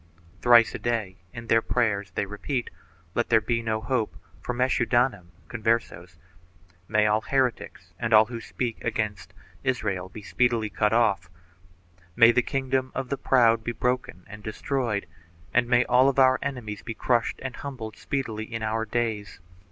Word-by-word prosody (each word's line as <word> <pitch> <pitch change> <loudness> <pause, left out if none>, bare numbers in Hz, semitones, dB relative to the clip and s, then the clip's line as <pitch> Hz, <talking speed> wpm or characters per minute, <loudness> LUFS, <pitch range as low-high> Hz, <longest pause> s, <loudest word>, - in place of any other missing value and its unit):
Thrice 120 -1 +6
a - - -5
day 110 -6 -2
in 115 +3 -8
their 115 0 +3
prayers 105 -6 0
they - - 0
repeat 115 +6 -4 0.4
"Let 120 - -1
there 110 - +5
be 115 +2 -1
no 110 -1 -1
hope 120 -2 -1 0.2
for - - -3
Meschudanim 120 -5 +1
( 80 - -29
Converses); 110 -7 -2 0.7
may 105 0 +2
all 105 +1 +2
heretics 130 -1 -2
and 115 -1 -2
all 110 0 +7
who 115 0 -7
speak 120 -1 -4
against 105 -3 -3 0.3
Israel 100 -8 -1
be 105 +3 -10
speedily 110 +4 0
cut 105 -1 +1
off; 110 -6 +2 0.9
may 115 +1 +7
the 125 - +3
kingdom 130 0 -1
of 135 -2 -3
the 140 - 0
proud 115 -4 +3
be 120 - -3
broken 125 -6 -2
and 105 +1 -11
destroyed 110 0 -2 0.5
and 125 0 +3
may 120 0 +3
all 130 +2 +4
our 130 -1 +5
enemies 120 -7 -5
be 115 - -6
crushed 120 0 0
and 130 -1 -5
humbled 125 -6 -7
speedily 115 -6 -4
in 115 -1 -4
our 110 +1 -1
days!' 110 -3 -3
115 Hz, 160 wpm, -26 LUFS, 105-125 Hz, 0.9 s, all